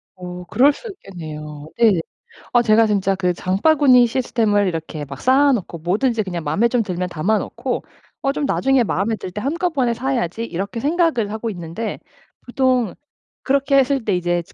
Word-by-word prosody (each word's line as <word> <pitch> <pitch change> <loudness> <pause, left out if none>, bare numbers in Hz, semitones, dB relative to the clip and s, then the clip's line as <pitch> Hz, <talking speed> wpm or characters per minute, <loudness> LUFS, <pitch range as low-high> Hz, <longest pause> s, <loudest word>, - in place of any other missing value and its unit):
어 180 -1 -8
그럴 260 +10 +4
수 470 - -10
있겠네요. 155 - -9
네네. 220 -7 +4 0.5
아 240 - +6
제가 225 0 +4
진짜 195 -2 +1
그 180 -1 0
장바구니 250 - +4
시스템을 220 -4 +1
이렇게 160 -3 -4
막 140 0 -9
쌓아 275 +3 +4
놓고 180 -7 -4
뭐든지 215 +7 0
그냥 175 -3 -5
마음에 200 +10 +2
좀 235 -1 +1
들면 180 -2 -3
담아 185 +6 0
놓고 245 +5 -4 0.4
어 275 - +2
좀 290 - -2
'나중에 270 -2 +2
마음에 215 +1 -1
들 185 - -7
때 210 - -5
한꺼번에 285 - 0
사야지.' 235 -5 -2
이렇게 200 +1 -4
생각을 295 - +1
하고 220 +1 -3
있는데 175 +4 -5 0.5
보통 250 -4 +1 0.5
그렇게 275 0 +2
했을 270 -1 +2
때 205 -4 +1
이제 175 -1 0
저 - - -21
220 Hz, 355 characters per minute, -20 LUFS, 180-260 Hz, 0.5 s, 아